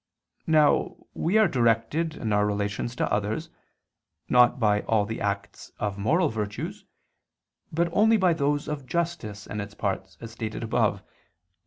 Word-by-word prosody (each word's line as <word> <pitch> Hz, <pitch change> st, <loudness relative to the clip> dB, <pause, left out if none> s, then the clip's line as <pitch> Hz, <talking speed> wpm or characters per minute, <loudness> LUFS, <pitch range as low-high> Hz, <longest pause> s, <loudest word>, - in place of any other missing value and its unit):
Now 155 Hz, -2 st, +3 dB, 0.2 s
we 180 Hz, +7 st, +1 dB
are 215 Hz, -2 st, +6 dB
directed 130 Hz, +5 st, +1 dB
in 110 Hz, -3 st, -2 dB
our 105 Hz, 0 st, +3 dB
relations 105 Hz, +3 st, -2 dB
to -, -, -1 dB
others, 110 Hz, +11 st, -2 dB, 0.8 s
not 125 Hz, +1 st, +5 dB
by 105 Hz, -2 st, +3 dB
all 110 Hz, -2 st, +1 dB
the 110 Hz, +2 st, -5 dB
acts 100 Hz, 0 st, -4 dB
of 100 Hz, -1 st, -3 dB
moral 160 Hz, -, +2 dB
virtues, 105 Hz, -3 st, -5 dB, 0.9 s
but 170 Hz, +2 st, +1 dB
only 220 Hz, +3 st, +5 dB
by 185 Hz, -4 st, +3 dB
those 145 Hz, -1 st, 0 dB
of 145 Hz, -4 st, -5 dB
justice 160 Hz, -, -3 dB
and 105 Hz, -, -4 dB
its 100 Hz, 0 st, -8 dB
parts, -, -, -3 dB
as 115 Hz, -1 st, -8 dB
stated 110 Hz, 0 st, -5 dB
above 110 Hz, -3 st, +1 dB
(Q. -, -, -34 dB
115 Hz, 155 wpm, -26 LUFS, 105-155 Hz, 0.9 s, are